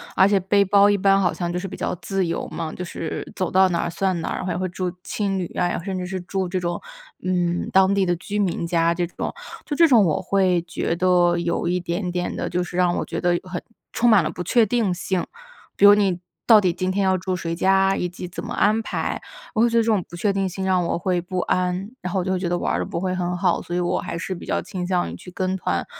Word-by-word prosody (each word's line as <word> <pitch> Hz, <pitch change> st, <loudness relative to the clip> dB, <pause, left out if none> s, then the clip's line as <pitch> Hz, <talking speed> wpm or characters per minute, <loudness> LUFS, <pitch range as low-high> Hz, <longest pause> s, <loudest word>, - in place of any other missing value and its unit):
而 190 Hz, -, +6 dB
且 200 Hz, -1 st, +3 dB
背 200 Hz, +2 st, +3 dB
包 200 Hz, +1 st, +5 dB
一 205 Hz, -, +3 dB
般 195 Hz, 0 st, +4 dB
好 175 Hz, -4 st, +2 dB
像 175 Hz, +1 st, -3 dB
就 180 Hz, -, -2 dB
是 195 Hz, -, -5 dB
比 -, -, -7 dB
较 -, -, -2 dB
自 195 Hz, -2 st, -1 dB
由 165 Hz, -, -3 dB
嘛， 160 Hz, -2 st, -5 dB
就 180 Hz, -, -5 dB
是 165 Hz, -2 st, -5 dB
走 185 Hz, -, -2 dB
到 190 Hz, 0 st, +5 dB
哪 170 Hz, -, 0 dB
儿 -, -, -1 dB
算 185 Hz, +1 st, -1 dB
哪 -, -, -3 dB
儿， -, -, -2 dB
然 -, -, -4 dB
后 185 Hz, -, -1 dB
也 -, -, -3 dB
会 185 Hz, 0 st, -2 dB
住 180 Hz, +1 st, -3 dB
青 200 Hz, -2 st, -2 dB
旅 180 Hz, -, -2 dB
啊， 175 Hz, -1 st, +1 dB
甚 190 Hz, -1 st, -3 dB
至 180 Hz, -, -3 dB
是 190 Hz, 0 st, -4 dB
住 190 Hz, +1 st, -2 dB
这 185 Hz, +1 st, -2 dB
种， 175 Hz, 0 st, -2 dB, 0.4 s
嗯， 175 Hz, -1 st, 0 dB
当 190 Hz, +1 st, +5 dB
地 195 Hz, -1 st, +2 dB
的 175 Hz, 0 st, +1 dB
居 205 Hz, +4 st, -4 dB
民 180 Hz, -3 st, 0 dB
家 170 Hz, 0 st, +2 dB
这 175 Hz, 0 st, -1 dB
种。 175 Hz, -, -5 dB, 0.3 s
就 295 Hz, -, -3 dB
这 335 Hz, -, +6 dB
种 230 Hz, -8 st, +5 dB
我 155 Hz, +1 st, 0 dB
会 185 Hz, -2 st, +2 dB
觉 165 Hz, 0 st, -2 dB
得 175 Hz, -1 st, +3 dB
有 170 Hz, 0 st, -1 dB
一 180 Hz, +1 st, +1 dB
点 180 Hz, +2 st, -3 dB
点 180 Hz, 0 st, -2 dB
的 -, -, -3 dB
就 180 Hz, +1 st, 0 dB
是 175 Hz, 0 st, -6 dB
让 180 Hz, -1 st, +3 dB
我 -, -, -2 dB
觉 -, -, -4 dB
得 175 Hz, -1 st, +2 dB
很 185 Hz, -1 st, -5 dB, 0.3 s
充 240 Hz, +1 st, +2 dB
满 205 Hz, -5 st, +6 dB
了 -, -, -1 dB
不 -, -, -7 dB
确 230 Hz, +5 st, +3 dB
定 215 Hz, -4 st, +1 dB
性， 185 Hz, 0 st, -2 dB, 0.5 s
比 205 Hz, -, +4 dB
如 205 Hz, -, +10 dB
你 195 Hz, -4 st, +1 dB, 0.3 s
到 220 Hz, -3 st, +8 dB
底 185 Hz, -4 st, +1 dB
今 185 Hz, +1 st, -2 dB
天 200 Hz, +1 st, 0 dB
要 190 Hz, -1 st, +3 dB
住 185 Hz, 0 st, -2 dB
谁 170 Hz, -1 st, -3 dB
家， 195 Hz, +1 st, +3 dB
以 180 Hz, -, -2 dB
及 180 Hz, 0 st, -7 dB
怎 175 Hz, -, -7 dB
么 -, -, -5 dB
安 215 Hz, +2 st, +2 dB
排， -, -, -3 dB, 0.3 s
我 220 Hz, -, +1 dB
会 235 Hz, -, +5 dB
觉 230 Hz, -, +1 dB
得 230 Hz, -, +4 dB
这 -, -, -4 dB
种 215 Hz, -5 st, +2 dB
不 175 Hz, -, -9 dB
确 200 Hz, +4 st, +1 dB
定 195 Hz, -1 st, 0 dB
性 190 Hz, +1 st, -4 dB
让 185 Hz, -2 st, +2 dB
我 -, -, -1 dB
会 175 Hz, 0 st, 0 dB
不 180 Hz, +1 st, -4 dB
安， 180 Hz, +3 st, -1 dB
然 180 Hz, -1 st, -4 dB
后 190 Hz, -, +1 dB
我 180 Hz, -, -2 dB
就 185 Hz, -, -1 dB
会 185 Hz, -, 0 dB
觉 175 Hz, -2 st, -2 dB
得 175 Hz, -, 0 dB
玩 -, -, -1 dB
儿 -, -, 0 dB
得 -, -, -1 dB
不 170 Hz, -, -4 dB
会 185 Hz, 0 st, -1 dB
很 180 Hz, 0 st, -2 dB
好， 180 Hz, -2 st, +1 dB
所 175 Hz, -, -5 dB
以 -, -, +1 dB
我 175 Hz, 0 st, 0 dB
还 -, -, -5 dB
是 185 Hz, +3 st, -4 dB
比 175 Hz, -, -9 dB
较 -, -, -1 dB
倾 180 Hz, -3 st, -5 dB
向 180 Hz, -, 0 dB
于 -, -, -7 dB
去 180 Hz, -, -11 dB
跟 185 Hz, +1 st, -1 dB
团。 -, -, -1 dB
185 Hz, 305 characters per minute, -23 LUFS, 175-195 Hz, 0.5 s, 如